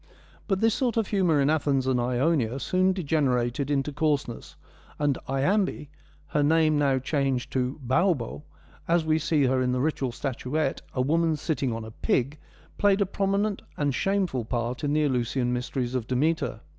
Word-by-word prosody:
But 195 -2 0
this 225 -1 +4
sort 240 -2 0
of 225 -3 0
humour 180 -7 +2
in 140 +2 +3
Athens 140 -4 +1
and 130 -1 +1
Ionia 125 0 +1
soon 185 +5 +2
degenerated 140 -7 0
into 145 0 0
coarseness, 145 -5 -2 0.4
and 145 -2 +1
Iambe, 165 +6 0 0.4
her 150 - +1
name 155 +1 +3
now 140 -2 +2
changed 135 -2 -1
to 130 +2 -1
Baubo, 135 0 +1 0.5
as 170 -1 +2
we 155 0 +2
see 155 -2 +1
her 130 0 +2
in 125 0 +1
the 125 - 0
ritual 135 -2 -1
statuette, 135 +3 -2
a 130 - +1
woman 160 +4 +2
sitting 150 -4 -2
on 115 -1 -4
a 110 - -9
pig, 135 +6 -1 0.4
played 200 -1 +4
a - - +4
prominent 200 +2 -1 0.2
and 145 -1 +1
a - - -1
shameful 185 -6 0
part 120 +3 -3
in 145 0 0
the 155 0 +2
Eleusinian 125 -2 0
mysteries 125 0 -2
of 125 -3 -2
De 130 - -1
meter. 155 +5 0
145 Hz, 175 wpm, -26 LUFS, 130-165 Hz, 0.5 s, this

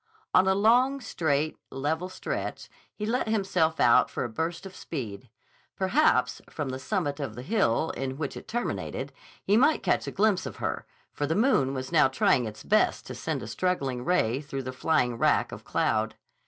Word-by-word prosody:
On 190 - +5
a 190 - +4
long, 245 +7 +4
straight, 155 - -1
level 160 +6 -2
stretch 185 - -5 0.2
he 210 - -5
let 235 +2 0
himself 185 -7 +1
out 120 -1 +5
for - - -3
a 120 - -3
burst 165 - -3
of 190 -1 -9
speed. 120 -6 -6 0.5
Perhaps, 225 +11 +2
from 145 -3 -4
the 130 0 -4
summit 145 -1 -2
of 135 -7 -4
the 120 - -7
hill 160 - +1
in 135 0 -4
which 145 -2 -4
it - - -9
terminated, 240 +2 -3 0.3
he 205 - +3
might 275 +6 +3
catch - - +1
a - - -3
glimpse 200 -2 +2
of - - -7
her, - - -3 0.3
for 145 - -2
the 160 - 0
moon 200 - +2
was 130 +2 -5
now 155 -5 +5
trying 130 -2 +2
its 110 0 -9
best 215 +1 +2
to - - -7
send - - -3
a - - -6
struggling 135 -9 -1
ray 135 -7 +1
through 135 -2 -5
the 130 0 -5
flying 125 -4 +1
wrack - - +2
of - - -8
cloud. - - 0
160 Hz, 190 wpm, -27 LUFS, 130-195 Hz, 0.5 s, On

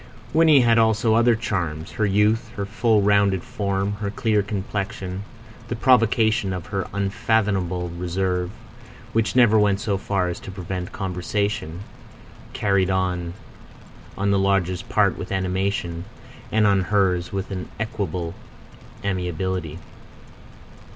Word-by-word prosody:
Winnie 155 -4 +6
had 115 -1 +4
also 110 0 +3
other 115 +1 +4
charms: 90 -7 -3
her 110 - 0
youth; 105 +4 +2
her 100 - -2
full, 110 0 +2
rounded 100 -2 +3
form; 100 0 -2
her 105 -1 -3
clear 105 0 +1
complexion; 100 -1 -4 0.5
the 120 - -3
provocation 115 -4 +3
of 90 -3 -5
her 95 -2 -3
unfathomable 100 -3 0
reserve, 90 +1 -1 0.6
which 115 +1 +1
never 115 -4 +6
went 100 -1 +3
so 100 -2 -1
far 95 -2 0
as 90 - -4
to - - -10
prevent 90 -1 -5
conversation, 95 -1 -2 0.7
carried 100 -2 +1
on 90 -2 -1 0.8
on 100 +1 +1
the 100 - +3
lodgers' 95 -2 +1
part - - +1
with - - -6
animation, 95 -2 -1 0.5
and 110 -1 +3
on 100 -2 +3
hers 95 -4 +1
with 100 0 -4
an 90 -2 -5
equable 95 -6 -3 0.7
amiability. 90 -3 -2
100 Hz, 125 wpm, -23 LUFS, 90-105 Hz, 0.8 s, Winnie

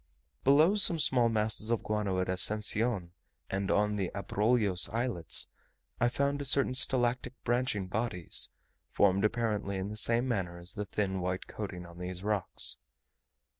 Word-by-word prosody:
Below 150 +7 +4
some 195 -5 +5
small 125 -6 +3
masses 110 0 0
of 115 -2 -1
guano 105 -3 -2
at 90 - -1
Ascension, 105 0 +1 0.4
and 95 0 -2
on 105 0 +1
the 95 -3 -2
Abrolhos 100 -3 +2
Islets, 115 - -1 0.5
I 120 - +2
found 140 +2 -1
certain 135 -1 +3
stalactitic 125 -1 +2
branching 120 -5 -1
bodies, 95 -3 +1 0.4
formed 100 -1 +2
apparently 105 -3 -1
in 95 +1 -4
the 105 - -7
same 115 +3 +1
manner 95 -8 -3
as 85 +2 -8
the 105 -2 -5
thin 95 -1 -3
white 90 +1 -3
coating 95 -4 -7
on 85 0 -13
these 90 +1 -6
rocks. 105 -3 0
105 Hz, 145 wpm, -30 LUFS, 95-120 Hz, 0.5 s, some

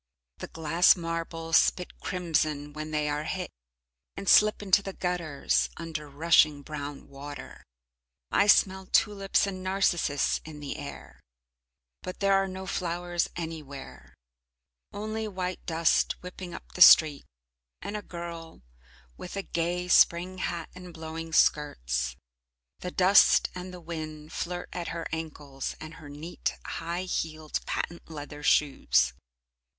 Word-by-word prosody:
The - - -5
glass 165 +2 +4
marbles 165 -1 -1
spit 180 - +1
crimson 155 -4 -1
when 155 +1 -5
they 150 -1 0
are 150 +1 -2
hit, - - -4 0.7
and 195 - -6
slip 210 0 +5
into 200 0 +4
the 195 -1 -6
gutters 175 -6 0
under 155 -3 -6
rushing 150 -1 +4
brown 145 -1 -7
water. 145 +1 -9 0.7
I 205 - +4
smell 190 -2 +4
tulips 200 -2 +2
and 190 -2 -5
narcissus 185 -6 +1
in 155 -1 -9
the 145 0 -5
air, 145 -2 -9 0.8
but 185 - -7
there 195 0 +3
are 195 0 +3
no 190 0 -6
flowers 175 -1 -2
anywhere, 155 -5 -8 0.8
only 215 +1 -4
white 185 -2 -4
dust 165 -1 +2
whipping 180 0 -8
up - - -10
the 180 - -7
street, 155 -5 +8 0.6
and 205 - -6
a 210 - -3
girl 170 - -8 0.5
with 180 - -8
a 195 - -2
gay 175 +1 -2
Spring 180 +1 +4
hat 170 -3 -3
and 180 -2 -11
blowing 160 0 -6
skirts. 65 - +1 0.6
The 180 - -4
dust 185 +2 +5
and 180 0 -7
the 180 - -9
wind 155 -2 -7
flirt 175 0 -4
at 175 -1 -4
her 170 -1 -4
ankles 150 -4 -5
and 155 +1 -8
her 145 - -10
neat, 150 +4 -4
high 170 +2 -3
heeled 155 -4 -3
patent 170 0 -4
leather 150 -1 -8
shoes. 140 - +3
165 Hz, 135 wpm, -28 LUFS, 150-180 Hz, 0.8 s, street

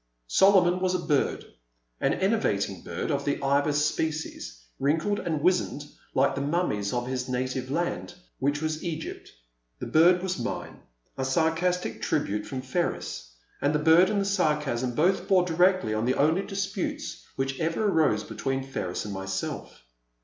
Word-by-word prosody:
Solomon 180 - +5
was 185 0 +1
a 175 - -3
bird, 145 -4 +1 0.5
an - - +1
enervating 100 - 0
bird 85 - -4
of 140 -1 0
the 145 - -1
Ibis 145 +2 +2
species, 155 - -3 0.2
wrinkled 160 +9 +1
and 155 -4 -2
wizened, 180 -5 +1 0.3
like 135 0 +3
the 140 - -3
mummies 140 - 0
of 120 -1 -1
his 130 0 -3
native 130 0 -2
land, 175 +3 -2 0.2
which 145 +3 0
was 155 0 -2
Egypt. 165 -2 -5 0.5
The - - -5
bird 175 +3 +5
was 185 -1 -2
mine, - - -4 0.4
a - - 0
sarcastic 165 +6 0
tribute 105 +1 -1
from 130 -1 -5
Ferris, 130 - -3 0.3
and 145 +2 +2
the - - +5
bird 165 +4 +5
and 210 -1 +1
the 195 - 0
sarcasm 150 -10 0
both 180 +5 +2
bore 185 -2 +4
directly 180 - +2
on 110 +1 0
the 130 - +2
only 160 +6 +3
disputes 195 -1 -4
which 135 0 -2
ever 165 +6 0
arose 155 - +2
between 135 0 -3
Ferris 105 -10 -4
and 105 - -5
myself. 95 -7 -5
150 Hz, 155 wpm, -27 LUFS, 130-180 Hz, 0.5 s, Solomon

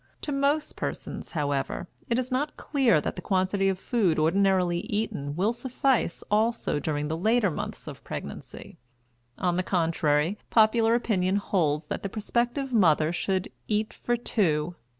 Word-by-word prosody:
To 295 - -3
most 280 +2 +1
persons, - - -5
however, 145 +1 -2 0.2
it 235 - +2
is 255 0 -2
not 290 +4 -1
clear 260 - +2
that - - -3
the 180 - -6
quantity 195 +1 +1
of 190 - -1
food 195 -5 +1
ordinarily 180 +1 +2
eaten 205 - -2
will 200 +7 +1
suffice 250 -5 0
also 220 -7 +1
during 150 0 -2
the 160 - -2
later 215 +3 +2
months - - -5
of - - -9
pregnancy. - - -8 0.6
On 180 -1 0
the - - +2
contrary, 165 0 +1
popular 225 +1 +4
opinion 195 -6 +1
holds 160 -7 0
that - - -4
the 195 - -3
prospective 240 +5 -1
mother 160 -6 +4
"should 190 +2 -1 0.2
eat 215 0 0
for 240 0 -1
two." 175 -8 0
195 Hz, 150 wpm, -27 LUFS, 165-235 Hz, 0.6 s, popular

